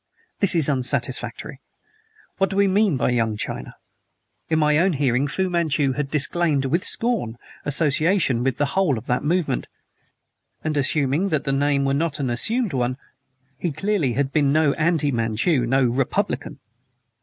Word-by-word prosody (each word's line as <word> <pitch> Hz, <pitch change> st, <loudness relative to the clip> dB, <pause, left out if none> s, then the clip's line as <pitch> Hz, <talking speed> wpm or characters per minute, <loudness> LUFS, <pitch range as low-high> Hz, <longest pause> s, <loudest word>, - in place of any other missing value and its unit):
This 200 Hz, -3 st, +4 dB
is 160 Hz, -4 st, +3 dB
unsatisfactory. 130 Hz, -3 st, -1 dB, 0.8 s
What 195 Hz, -, +2 dB
do 195 Hz, -, -4 dB
we 200 Hz, 0 st, +3 dB
mean 195 Hz, -5 st, +2 dB
by 125 Hz, -, 0 dB
Young 115 Hz, -3 st, 0 dB
China? -, -, -5 dB, 0.7 s
In 160 Hz, -, +2 dB
my 150 Hz, -1 st, +3 dB
own 185 Hz, +1 st, +2 dB
hearing 135 Hz, -1 st, +1 dB
Fu 190 Hz, +7 st, -1 dB
Manchu 160 Hz, -6 st, 0 dB
had 140 Hz, +1 st, -3 dB
disclaimed, 150 Hz, -1 st, +1 dB
with 170 Hz, +8 st, 0 dB
scorn, 225 Hz, -, -1 dB, 0.3 s
association 150 Hz, -1 st, +2 dB
with 130 Hz, -2 st, -1 dB
the 145 Hz, -, +1 dB
whole 185 Hz, -10 st, +2 dB
of 110 Hz, -, -8 dB
that 125 Hz, +1 st, -1 dB
movement; 160 Hz, -, -1 dB, 1.0 s
and 155 Hz, -1 st, -2 dB
assuming 145 Hz, +5 st, +1 dB
that 155 Hz, -4 st, -1 dB
the 135 Hz, -, -1 dB
name 140 Hz, 0 st, +1 dB
were 135 Hz, -, +1 dB
not 155 Hz, +1 st, -1 dB
an 130 Hz, -4 st, -1 dB
assumed 220 Hz, -, 0 dB
one, 125 Hz, 0 st, -1 dB, 0.6 s
he 175 Hz, -, -2 dB
clearly 160 Hz, -, -1 dB
can -, -, -6 dB
have 140 Hz, -1 st, -1 dB
been 145 Hz, -3 st, +2 dB
no 155 Hz, -1 st, +3 dB
anti 155 Hz, -2 st, +1 dB
Manchu, 115 Hz, +3 st, 0 dB
no 135 Hz, +2 st, +2 dB
Republican. 125 Hz, +1 st, -1 dB
145 Hz, 165 wpm, -22 LUFS, 135-170 Hz, 1.0 s, This